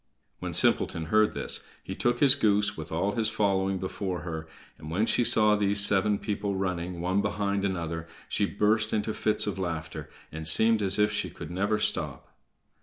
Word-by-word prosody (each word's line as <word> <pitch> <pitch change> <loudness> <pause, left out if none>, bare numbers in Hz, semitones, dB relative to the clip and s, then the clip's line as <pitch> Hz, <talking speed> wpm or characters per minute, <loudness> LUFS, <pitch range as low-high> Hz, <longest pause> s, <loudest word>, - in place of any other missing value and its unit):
When - - -5
Simpleton 80 -1 +1
heard 110 0 +4
this - - -2 0.2
he - - -6
took 120 0 -1
his 140 -2 +7
goose, 105 -5 +1
with 80 -2 -8
all 90 +5 -1
his 110 0 +1
following, 95 -2 0
before 95 -1 -4
her, 80 -2 -6 0.3
and 75 0 -9
when 95 +7 0
she 120 - +1
saw 105 -2 +5
these 100 0 +1
seven 100 +1 +4
people 100 -1 -3
running, 90 -2 -3
one 95 +3 0
behind 100 -1 -2
another, 85 -4 -3 0.2
she 100 - 0
burst 110 +2 +1
into 110 0 -1
fits 110 - +1
of 100 -2 -4
laughter, 80 -4 -5 0.2
and 80 +1 -4
seemed 110 +6 +5
as 100 0 +2
if 105 0 +2
she 105 - -2
could - - -10
never 100 +4 0
stop. 105 0 -1
100 Hz, 180 wpm, -27 LUFS, 90-105 Hz, 0.3 s, his